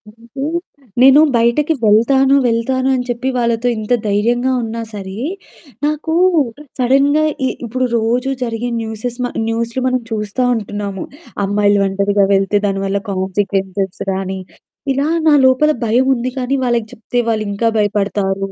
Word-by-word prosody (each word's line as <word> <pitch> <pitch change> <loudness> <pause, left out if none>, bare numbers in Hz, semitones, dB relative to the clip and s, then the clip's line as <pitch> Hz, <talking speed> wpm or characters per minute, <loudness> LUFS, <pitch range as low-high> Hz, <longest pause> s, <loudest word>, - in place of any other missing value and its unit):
అయితే 235 +4 -8 0.6
నేను 270 +3 +8
బయటకి 235 +7 +2
వెళ్తాను 265 +6 +4
వెళ్తాను 255 +3 0
అని 250 - -1
చెప్పి 245 +2 -1
వాళ్ళతో 235 0 0
ఇంత 215 +3 -1
ధైర్యంగా 240 +5 +1
ఉన్నా 230 +1 -4
సరే, 195 0 -7 0.7
నాకు 305 +2 -1 0.7
సడెన్‌గా 275 +4 +3 0.2
ఇ - - 0 0.2
ఇప్పుడు 255 +3 -1
రోజూ 245 +4 0
జరిగె 235 +1 -3
న్యూసెస్ 225 +2 -5
మ - - 0 0.2
న్యూస్లు 230 +2 -2
మనం 255 -1 0
చూస్తా 210 +3 -2
ఉంటున్నాము. 205 -3 -4 0.4
అమ్మాయిలు 205 0 +2
ఒంటరిగా 200 +1 +1
వెళ్తే 195 +1 +2
దాని 195 -1 -1
వల్ల 200 +1 0
కాన్సీక్వెన్సెస్ 190 0 -2
గాని, 190 0 -3 0.5
ఇలా 280 +3 0 0.2
నా 300 - +6
లోపల 260 +4 +4
భయముంది 255 +2 +1
కానీ, 265 +2 0
వాళ్ళకి 235 -2 0
జేప్తే 240 +2 -2
వాళ్ళింకా 215 0 0
భయపడతారు. 195 -1 -1
230 Hz, 130 wpm, -17 LUFS, 205-255 Hz, 0.7 s, నేను